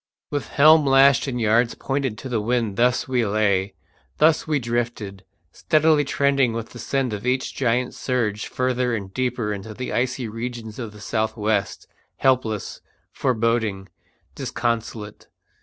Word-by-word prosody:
With 145 -1 -2
helm 155 +2 +6
lashed 135 +1 +5
and 125 -2 -2
yards 115 +2 +2
pointed 135 -5 -2
to 130 - -7
the 120 -4 -1
wind 115 -2 0
thus 120 +3 +2
we 125 -2 +1
lay, 100 -2 +1 0.4
thus 155 +1 +3
we 155 -1 +2
drifted, 115 -5 -3 0.3
steadily 155 -1 +3
trending 140 -3 +2
with 115 0 -5
the 120 - -10
send 135 -3 -1
of 105 - -5
each 130 +1 0
giant 125 -1 0
surge 110 -5 -2
further 125 -1 0
and 100 -3 -6
deeper 125 -4 -1
into 105 +2 -7
the 125 - -5
icy 130 0 -1
regions 115 0 -6
of 115 -4 -5
the 105 0 -14
south 110 0 -2
west, 105 -2 -1 0.3
helpless, 125 -6 0 0.3
foreboding, 110 -5 0 0.4
disconsolate. 115 -3 -3
120 Hz, 145 wpm, -23 LUFS, 110-130 Hz, 0.4 s, helm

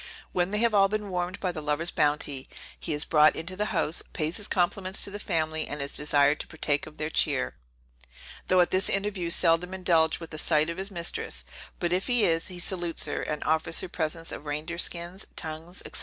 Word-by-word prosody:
When 175 0 +1
they 210 - -1
have 230 0 +2
all 195 -1 +6
been 210 -1 -3
warmed 180 +1 -2
by 185 - -1
the 160 -3 -6
lover's 150 +3 0
bounty, 145 -2 0 0.3
he - - -4
is 150 - +2
brought 155 -1 +5
into 170 +3 -4
the 210 +2 0
house, 165 -5 -1
pays 155 +2 -1
his 205 - -4
compliments 185 +1 +1
to 200 - -2
the 205 - -6
family, 160 -5 -1
and 145 - -5
is 140 0 -3
desired 145 0 +3
to - - -4
partake 150 -2 -1
of 155 - -13
their 155 +1 -3
cheer, 65 - +2 0.9
though 185 0 +5
at 175 - +2
this 185 +1 +4
interview 195 -3 0
seldom 170 +1 +3
indulged 165 -4 +3
with 165 -2 -9
a 155 - +1
sight 155 +1 +3
of 170 - -7
his 195 +1 -2
mistress; 170 - -3 0.3
but 175 0 0
if 185 +1 0
he 245 -4 +3
is, 165 -1 +1
he 180 -2 -5
salutes 175 -2 0
her, - - -2
and 150 -1 -3
offers 160 +1 +1
her - - -6
presents 165 -1 -3
of 150 - -8
reindeer 155 +4 -3
skins, 175 +3 -2
tongues, 160 +3 -5
&c. - - -3
170 Hz, 215 wpm, -28 LUFS, 155-185 Hz, 0.9 s, all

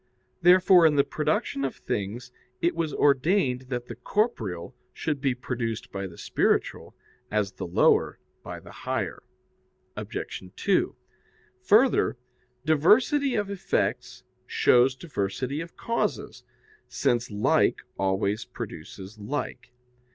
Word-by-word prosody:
Therefore 180 -1 +7
in 150 - +2
the 140 - +5
production 140 -2 -1
of 135 - -2
things 115 +5 -4 0.3
it 170 - +1
was 165 -2 -1
ordained 140 -2 +2
that 120 -2 -3
the 120 - -7
corporeal 115 - -2 0.2
should 150 -4 -3
be 135 -3 +1
produced 115 -3 -4
by 100 0 -4
the 85 - -13
spiritual, - - 0 0.3
as 105 -2 0
the 95 - -6
lower 85 - +3 0.2
by - - -7
the - - -14
higher. - - -3 0.7
Obj. - - -5
2: - - +1 0.7
Further, 225 - +4 0.5
diversity 240 - +4
of 205 -2 -1
effects 200 - -2 0.2
shows 125 +1 +4
diversity 130 - -3
of 165 0 -10
causes, 230 0 -2 0.4
since 120 0 0
like 105 -1 +2
always 95 +2 0
produces 95 +6 -9
like. 135 +8 -5
130 Hz, 115 wpm, -26 LUFS, 105-170 Hz, 0.7 s, Therefore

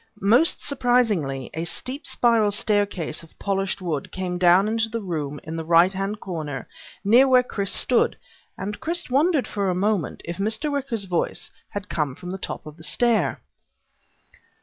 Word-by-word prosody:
Most 240 - +3
surprisingly, 220 - +1
a 160 - -3
steep 255 - -4
spiral 230 -3 +3
staircase 205 -6 +1
of 165 - -18
polished 195 -1 -2
wood 155 -6 -3
came 180 -1 -3
down 180 +3 +5
into 225 +1 0
the 230 +1 -3
room 155 -8 -4
in 160 - -6
the 165 - -3
right 170 +3 +5
hand 195 +2 -3
corner 155 -9 -5 0.4
near 240 +6 +6
where 255 -1 +5
Chris 200 -5 -2
stood, 245 +3 +2 0.4
and 205 +2 -5
Chris 335 -4 -2
wondered 295 +1 +2
for 200 -2 -1
a 180 - 0
moment, 195 - -1
if 170 0 -5
Mr. 220 +9 0
Wicker's 265 -7 -2
voice 180 -2 -2 0.2
had 205 0 -5
come 150 -8 -2
from 180 +3 -8
the 190 - -5
top - - -6
of 155 0 -10
the 160 - -12
stair. 235 +7 +1
200 Hz, 170 wpm, -24 LUFS, 170-235 Hz, 0.4 s, near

